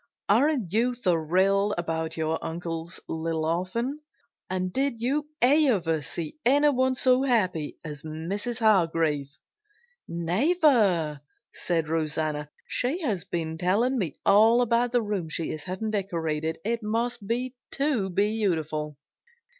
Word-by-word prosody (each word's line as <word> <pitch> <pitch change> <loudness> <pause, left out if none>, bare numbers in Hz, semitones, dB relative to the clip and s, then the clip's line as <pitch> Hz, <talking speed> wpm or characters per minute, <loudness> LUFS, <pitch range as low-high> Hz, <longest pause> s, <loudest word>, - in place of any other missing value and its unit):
"Aren't 240 - +2
you 240 +3 +2
thrilled 190 +1 +2
about 160 -2 -2
your 160 0 -1
uncle's 165 +1 -5
little 160 0 -2
orphan? 185 - -1 0.5
And 185 -1 -2
did 270 -3 0
you 280 +5 0 0.2
ever 240 - +3
see 160 - -5
anyone 260 -1 +3
so 255 0 +3
happy 185 - 0
as 150 -2 -7
Mrs. 180 +9 -4
Hargrave?" 165 - +2 0.8
"Never!" 185 - +2 0.3
said 165 -3 -1
Rosanna. 155 -2 -1 0.2
"She 280 +9 -1
has 210 - -1
been 160 -1 -3
telling 230 +9 +2
me 170 -9 -2
all 225 +4 +6
about 235 +1 +1
the 245 -2 +2
room 200 -6 -3
she 160 +1 -2
is 155 -1 -6
having 190 +4 -3
decorated. 160 -6 -2
It 230 +1 -1
must 230 0 -2
be 250 +3 -1 0.2
too 275 -9 0
beautiful!" 170 -7 -1
190 Hz, 125 wpm, -26 LUFS, 160-240 Hz, 0.8 s, all